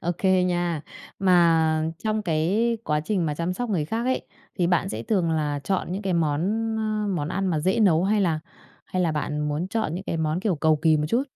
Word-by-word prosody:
Ô 175 - -1
kê 185 -1 +3
nha. 175 -3 0 0.4
Mà 165 -4 +4 0.2
trong 215 0 0
cái 195 +8 +1
quá 150 0 +1
trình 180 +1 -1
mà 150 - -1
chăm 170 +3 -2
sóc 245 +3 -4
người 165 -7 0
khác 225 +8 -2
ấy, 260 +1 -1 0.3
thì 175 - +3
bạn 175 -1 +1
sẽ 110 +1 -4
thường 180 - +1
là 150 -2 -1
chọn 190 -2 -1
những 200 +3 -3
cái 190 -2 -1
món, 155 -3 +1 0.4
ơ, 215 -1 -1
món 150 -2 -2
ăn 195 +1 -1
mà 160 -4 0
dễ 185 +7 +1
nấu 180 -4 +4
hay 205 +1 +2
là 165 -5 +1 0.5
hay 185 0 -2
là 165 -3 +1
bạn 150 0 -2
muốn 155 +5 -2
chọn 220 -8 -1
những 185 +3 -5
cái 165 - -2
món, 160 +2 -1
kiểu, 200 -3 +1
cầu 155 +1 +3
kỳ 155 0 +3
một 150 0 0
chút? 235 +7 +2
175 Hz, 235 wpm, -25 LUFS, 155-195 Hz, 0.5 s, Mà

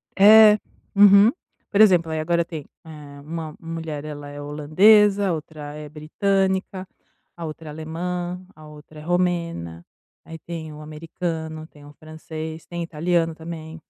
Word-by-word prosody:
É, 215 +1 +8 0.4
uhum. 200 +2 +7 0.4
Por 205 - +3
exemplo 175 -6 +5
aí 160 - -2
agora 170 +2 +1
tem 155 -5 -8 0.2
eh 150 -3 -11
uma 160 0 -6
uma 165 0 -8
mulher 155 -3 -5
ela 145 -1 -8
é 145 0 -8
holandesa, 195 +8 +4
a - - +1
outra 150 -2 -7
é 150 -1 -9
britânica, 190 +4 -1 0.5
a 170 -1 -7
outra 155 0 -8
é - - -7
alemã, 175 +3 -5
a 155 0 -14
outra 150 0 -14
é - - -11
romena, 170 - -2 0.4
aí 165 - -9
tem 160 -2 -7
o 150 - -11
americano, 160 0 -6
tem 145 -2 -18
o 145 - -14
francês, 160 +1 -8
tem 175 -1 -5
italiano 165 0 -1
também. 160 0 -9
160 Hz, 155 wpm, -22 LUFS, 155-180 Hz, 0.5 s, É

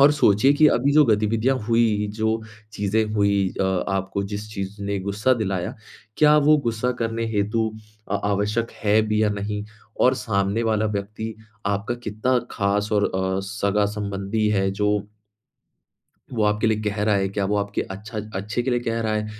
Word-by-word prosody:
और 145 +2 +7
सोचिए 130 -1 +4
कि 155 +1 +6
अभी 140 +4 +2
जो 150 0 +6
गतिविधियाँ 110 +3 +2
हुई, 115 -3 +2
जो 110 0 0 0.3
चीज़ें 105 +2 0
हुई 100 -2 +2
अ, - - +2 0.2
आपको 95 0 -1
जिस 105 +1 -5
चीज़ 100 +1 -5
ने 100 0 -2
गुस्सा 100 +6 +1
दिलाया, 95 -5 -2 0.4
क्या 150 0 +6
वो 150 +1 +5
गुस्सा 115 +2 0
करने 115 0 -1
हेतु 110 +2 0 0.4
आ - - +3
आवश्यक 105 +3 0
है 105 +1 +4
भी 110 0 +2
या 105 - +3
नहीं? 105 0 -3 0.4
और 130 +1 +5
सामने 100 -1 0
वाला 110 -1 +1
व्यक्ति 110 +2 -5 0.3
आपका 100 +4 -1
कितना 110 +5 +1
ख़ास 100 +1 0
और 105 -1 +3
अ, 95 0 0
सगा-संबंधी 100 +1 -1
है 95 -2 +1
जो 105 +1 0 1.4
वो 110 -3 0
आपके 105 +1 +1
लिए 110 -1 +1
कह 105 0 -1
रहा 105 -1 +3
है, 95 -1 +1
क्या 100 0 -2
वो 105 +1 0
आपके 100 0 -1
अच्छा 105 +3 -7 0.2
अच्छे 105 +5 -2
के 130 - -1
लिए 120 0 +1
कह 115 -1 -2
रहा 110 -1 -1
है, 105 0 -1
105 Hz, 175 wpm, -23 LUFS, 100-115 Hz, 1.4 s, और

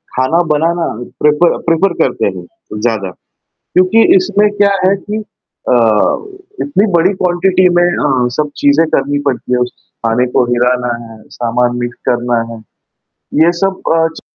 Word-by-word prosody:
खाना 130 +7 +1
बनाना 165 +3 0 0.4
prefer 150 +3 +3
prefer 170 +3 +2
करते - - -1
हैं - - -9 0.4
ज़्यादा। 110 -5 -1 0.6
क्योंकि 185 +5 +4
इसमें 210 - +2
क्या 200 0 +4 0.2
है 195 - +3
कि 210 +2 -5 0.5
अ, - - +4 0.9
इतनी 220 -7 +1
बड़ी 175 +3 +3
क्वांटिटी 185 0 +2
में - - +4
अ, 135 -8 +1
सब 150 -1 -1
चीज़ें 145 +3 +3
करनी 145 +1 0
पड़ती 125 -1 -2
है 125 - +2
उस 125 0 -1 0.3
खाने 120 +2 +2
को - - +2
हिलाना 125 0 0
है, 115 -1 -13
सामान 120 +1 -1
मिक्स 120 0 -4
करना 120 -1 0
है। - - -9 0.9
ये 170 - +3
सब 190 +2 -2 0.2
अ, 165 0 +3
च - - -9
150 Hz, 150 wpm, -13 LUFS, 125-180 Hz, 0.9 s, क्योंकि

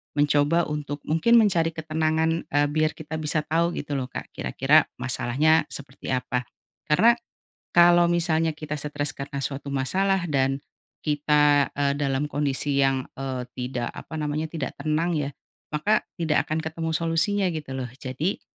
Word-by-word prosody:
mencoba 145 +3 +3
untuk 145 -1 -4
mungkin 230 +10 +5
mencari 170 -6 +3
ketenangan, 160 +1 0
eee, 145 0 +3
biar 155 +1 +1
kita 160 0 -7
bisa 155 0 0
tahu 170 +2 +2
gitu 145 0 -4
loh 130 -2 -2
Kak - - -6
kira-kira - - +3 0.2
masalahnya 150 +6 +2
seperti 135 -1 -7
apa 125 0 -1 0.4
karena, 225 +10 +5 0.6
kalau 175 0 +7
misalnya 165 -2 +1
kita 155 -2 -5
stres 145 0 -3
karena 140 0 -5
suatu 140 0 -4
masalah 185 +8 +1
dan, 135 -1 +2 0.5
kita, 150 -1 +3
eee, 140 0 +2
dalam 135 0 0
kondisi 140 0 0
yang, 135 -1 +2
eee, 130 -2 -4
tidak 125 -1 -3
apa 160 - -9
namanya 150 +1 -2
tidak 150 -5 -4
tenang 155 +4 0
ya, 145 -2 -1 0.5
maka 210 +8 +2 0.2
tidak 160 -3 +1
akan 160 +1 -1
ketemu 160 +1 -3
solusinya 165 +5 +1
gitu 150 -4 -5
loh 125 -2 -4
jadi, 135 +9 -2
150 Hz, 150 wpm, -25 LUFS, 140-160 Hz, 0.6 s, kalau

